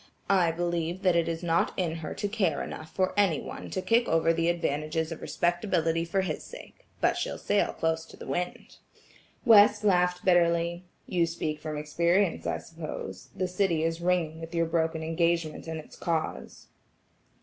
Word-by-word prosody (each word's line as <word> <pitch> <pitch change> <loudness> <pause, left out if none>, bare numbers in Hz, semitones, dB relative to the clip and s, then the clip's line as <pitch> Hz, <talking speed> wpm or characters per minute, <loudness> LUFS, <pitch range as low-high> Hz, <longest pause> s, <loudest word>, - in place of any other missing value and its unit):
"I 180 -4 +4
believe 170 +2 -2
that 180 -2 +4
it 170 -1 +2
is 165 +1 -3
not 170 -1 +1
in 165 -3 -1
her 160 - -6
to 205 - -2
care 200 -7 0
enough 155 +1 -7
for 185 -1 0
any 195 -8 +3
one - - -7
to 185 - -3
kick 235 +1 +3
over 165 0 +3
the 165 0 +1
advantages 160 -1 -1
of 165 - -6
respectability 170 -2 0
for 190 +3 0
his 170 -5 -3
sake, - - -13
but - - +3
she'll - - -2
sail - - +1
close 160 0 -1
to - - -14
the - - -9
wind." 180 0 -4 0.7
West 210 -2 +7
laughed 180 -3 +2
bitterly: 170 -1 +2 0.2
"You 170 -2 +1
speak 155 -2 -3
from 155 0 -5
experience 170 +5 +1
I - - 0
suppose; 155 - -7
the 185 - -1
city 180 -3 +1
is 165 +1 -1
ringing 170 -3 0
with 165 +1 -7
your 165 0 +2
broken 160 0 0
engagement 165 -1 0
and 160 -1 -4
its 155 - -12
cause." 165 -2 -3
170 Hz, 175 wpm, -28 LUFS, 160-180 Hz, 0.7 s, West